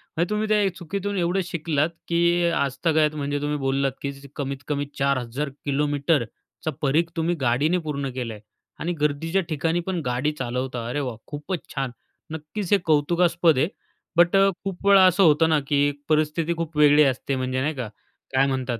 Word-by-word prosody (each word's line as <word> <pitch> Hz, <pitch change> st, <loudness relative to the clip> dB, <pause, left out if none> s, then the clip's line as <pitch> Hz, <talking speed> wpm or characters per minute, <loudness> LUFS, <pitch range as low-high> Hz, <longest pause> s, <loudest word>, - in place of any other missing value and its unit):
म्हणजे 170 Hz, +3 st, 0 dB
तुम्ही 210 Hz, +1 st, 0 dB
त्या 205 Hz, -4 st, +2 dB
चुकीतून 200 Hz, +4 st, -4 dB
एवढं 175 Hz, +2 st, +1 dB
शिकलात, 155 Hz, -3 st, 0 dB, 0.2 s
की 170 Hz, +1 st, +2 dB
आजतागायत 155 Hz, +2 st, +1 dB
म्हणजे 145 Hz, 0 st, -2 dB
तुम्ही 150 Hz, 0 st, -1 dB
बोललात 135 Hz, 0 st, 0 dB
की 140 Hz, -, -2 dB, 0.2 s
कमीतकमी 140 Hz, +1 st, -3 dB
4000 140 Hz, 0 st, -1 dB, 0.2 s
किलोमीटरचा 145 Hz, +1 st, -1 dB
परिघ 150 Hz, +4 st, +2 dB
तुम्ही 165 Hz, +1 st, 0 dB
गाडीने 135 Hz, +8 st, +2 dB
पूर्ण 140 Hz, -2 st, -2 dB
केला 120 Hz, -3 st, -3 dB
आहे 105 Hz, -, -11 dB, 0.4 s
आणि 175 Hz, +2 st, -2 dB
गर्दीच्या 160 Hz, +5 st, +1 dB
ठिकाणी 165 Hz, +3 st, 0 dB
पण 185 Hz, -2 st, -1 dB
गाडी 125 Hz, +5 st, 0 dB
चालवता. 125 Hz, -1 st, -3 dB
अरे 145 Hz, +4 st, -2 dB
वाह! 125 Hz, -5 st, -3 dB
खूपच 150 Hz, +5 st, -4 dB, 0.2 s
छान. 135 Hz, -2 st, -2 dB, 0.4 s
नक्कीच 160 Hz, +5 st, -5 dB
हे -, -, +7 dB
कौतुकास्पद 170 Hz, +1 st, +3 dB
आहे. 145 Hz, +5 st, +3 dB, 0.5 s
बट 175 Hz, +3 st, +5 dB
अ, 195 Hz, 0 st, +6 dB
खूप 195 Hz, 0 st, -4 dB
वेळा 195 Hz, -1 st, +8 dB
असं 185 Hz, +2 st, +4 dB
होतं 160 Hz, 0 st, +5 dB
ना 155 Hz, -, +3 dB
की 145 Hz, -1 st, +2 dB, 0.2 s
परिस्थिती 155 Hz, +2 st, +1 dB
खूप 165 Hz, -2 st, -4 dB
वेगळी 150 Hz, 0 st, +6 dB
असते 135 Hz, 0 st, 0 dB
म्हणजे 130 Hz, 0 st, -1 dB
नाही 150 Hz, +3 st, -1 dB
का? 125 Hz, -4 st, -4 dB, 0.5 s
काय 135 Hz, +1 st, +4 dB
म्हणतात 130 Hz, -3 st, -2 dB
150 Hz, 165 wpm, -24 LUFS, 135-170 Hz, 0.5 s, वेळा